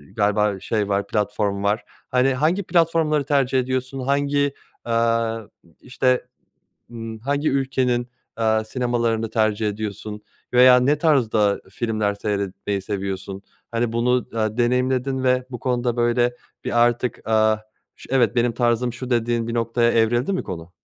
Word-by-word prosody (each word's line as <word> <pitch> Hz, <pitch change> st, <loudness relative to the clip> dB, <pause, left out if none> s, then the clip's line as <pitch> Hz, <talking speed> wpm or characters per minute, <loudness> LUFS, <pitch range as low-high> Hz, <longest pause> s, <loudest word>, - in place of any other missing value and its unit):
galiba 105 Hz, -1 st, +1 dB
şey 105 Hz, 0 st, -1 dB
var 100 Hz, 0 st, 0 dB
platform 105 Hz, -1 st, -1 dB
var. 105 Hz, +2 st, +1 dB, 0.3 s
Hani, 130 Hz, +1 st, +3 dB
hangi 160 Hz, +9 st, +1 dB
platformları 165 Hz, -4 st, +2 dB
tercih 135 Hz, -2 st, +2 dB
ediyorsun 130 Hz, +1 st, -2 dB
hangi, 140 Hz, +1 st, +1 dB, 0.3 s
eee, 115 Hz, -1 st, +1 dB, 0.4 s
işte, 125 Hz, 0 st, 0 dB, 0.7 s
ımm, 115 Hz, -1 st, -7 dB
hangi 140 Hz, +5 st, -1 dB
ülkenin, 130 Hz, -2 st, 0 dB, 0.3 s
eee, 110 Hz, -1 st, +2 dB
sinemalarını 115 Hz, -2 st, -1 dB
tercih 110 Hz, -1 st, +1 dB
ediyorsun 105 Hz, 0 st, -5 dB, 0.3 s
veya 125 Hz, 0 st, +7 dB
ne 140 Hz, +4 st, +2 dB
tarzda 115 Hz, -10 st, +2 dB
filmler 110 Hz, -1 st, -1 dB
seyretmeyi 100 Hz, -1 st, -3 dB
seviyorsun? 95 Hz, -1 st, -4 dB, 0.3 s
Hani, 115 Hz, 0 st, -1 dB
bunu 125 Hz, +2 st, +1 dB
da 110 Hz, -1 st, -1 dB
deneyimledin 125 Hz, +2 st, +1 dB
ve 125 Hz, 0 st, +2 dB
bu 125 Hz, -, -6 dB
konuda 125 Hz, -2 st, -1 dB
böyle 120 Hz, +1 st, +1 dB, 0.3 s
bir 120 Hz, 0 st, +3 dB
artık, 120 Hz, +1 st, -1 dB
aaa, 110 Hz, 0 st, +3 dB, 0.4 s
ş -, -, -14 dB
evet 120 Hz, -4 st, +3 dB
benim 120 Hz, 0 st, +2 dB
tarzım 120 Hz, 0 st, +1 dB
şu 130 Hz, +1 st, -7 dB
dediğin 120 Hz, -1 st, +1 dB
bir 115 Hz, -, -3 dB
noktaya 115 Hz, 0 st, +2 dB
evrildi 120 Hz, -, +2 dB
mi 185 Hz, -, -1 dB
konu? 85 Hz, -1 st, -8 dB
120 Hz, 140 wpm, -22 LUFS, 110-130 Hz, 0.7 s, veya